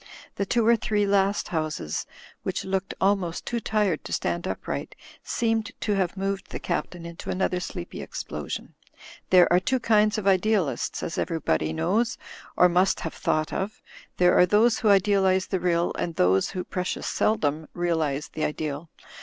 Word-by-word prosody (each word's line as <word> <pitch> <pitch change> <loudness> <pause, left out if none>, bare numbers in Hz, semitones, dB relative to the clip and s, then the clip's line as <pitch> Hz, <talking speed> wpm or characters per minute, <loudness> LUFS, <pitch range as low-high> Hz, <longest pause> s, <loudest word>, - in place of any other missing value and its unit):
The 200 - -1
two 235 +1 +2
or 235 +1 +6
three 210 -2 0
last 200 0 +1
houses, 155 - -2 0.3
which - - -3
looked 190 0 -2
almost 190 -4 +1
too 240 - -1
tired 215 -2 0
to - - -7
stand - - -1
upright, - - -4 0.3
seemed 225 -2 0
to 210 - 0
have 190 -1 0
moved 195 0 -2
the - - -5
Captain 175 -2 -3
info 170 0 -8
another 185 -1 0
sleepy 130 - -6
explosion. 75 -3 -6 0.6
"There 180 -1 +7
are 180 - +6
two 260 +8 0
kinds 215 -1 +3
of 215 - -3
idealists, 190 - +1
as 165 - -3
everybody 80 - 0
knows— 215 - 0 0.4
or 180 - +7
must 180 +2 +2
have 165 - -4
thought 155 0 -1
of. 200 +3 -3 0.4
There 180 0 +5
are 180 - +6
those 220 +5 +4
who 220 - +2
idealize 190 -1 +4
the 190 - -2
real 175 -1 +1
and 170 - -3
those 95 - +3
who 185 -2 -4
(precious 180 0 -3
seldom) 155 -7 0
realize 160 -5 -1
the 155 - -4
ideal. 150 +1 -3
185 Hz, 165 wpm, -26 LUFS, 165-205 Hz, 0.6 s, There